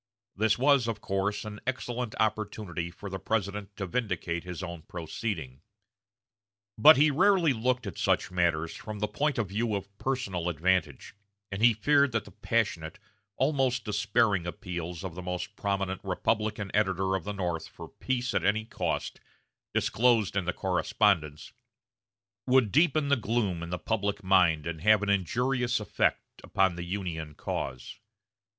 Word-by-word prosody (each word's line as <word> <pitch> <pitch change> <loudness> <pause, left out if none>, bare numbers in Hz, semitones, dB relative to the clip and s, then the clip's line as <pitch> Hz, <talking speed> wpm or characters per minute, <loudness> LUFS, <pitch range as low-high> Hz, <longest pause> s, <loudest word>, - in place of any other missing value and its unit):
This 110 +1 +2
was, 135 -2 +4
of 115 -2 -2
course, 100 +2 -2
an 105 -1 -7
excellent 125 -3 -3
opportunity 105 -5 -1
for 100 +4 -9
the 95 -1 -5
President 100 0 -2
to 95 - -3
vindicate 90 -5 -2
his 90 0 -6
own 85 -2 -6
proceeding. 80 - -5 1.1
But 150 +7 +8
he 150 +2 +5
rarely 175 -1 +4
looked 125 +1 0
at 100 -5 -6
such - - +1
matters 85 -3 +1
from 110 -1 -7
the 105 +1 -1
point 150 +5 -1
of 110 -5 -1
view 110 +2 -1
of 100 0 -6
personal 100 -10 -2
advantage, 90 +2 0 0.4
and 95 +2 -4
he 115 -1 +6
feared 140 +4 +3
that 115 - -1
the 100 - -13
passionate, 100 -5 -1 0.4
almost 130 -4 +1
despairing 105 -3 +1
appeals 85 +1 -5
of 95 -3 -5
the 90 - -7
most 90 +3 -4
prominent 95 -2 -2
Republican 105 +1 -1
editor 95 -2 +1
of 95 - -3
the 105 - -4
North 90 -4 -3
for - - -10
peace 125 -1 -2
at - - +1
any 110 +2 +1
cost, - - -3 0.5
disclosed 115 -4 +2
in 100 -3 0
the 90 - +1
correspondence, 75 -8 0 0.9
would 125 -5 +4
deepen 155 -1 +3
the 140 - +5
gloom 110 -7 -1
in 85 - -5
the 90 - -2
public 100 0 -2
mind 90 -5 +4
and 80 -2 -4
have 105 +2 +5
an 105 - -1
injurious 125 +6 +1
effect 105 -4 -1
upon 95 -2 +2
the 85 - -5
Union 85 -5 -4
cause. 65 +7 -5
100 Hz, 155 wpm, -29 LUFS, 90-115 Hz, 1.1 s, But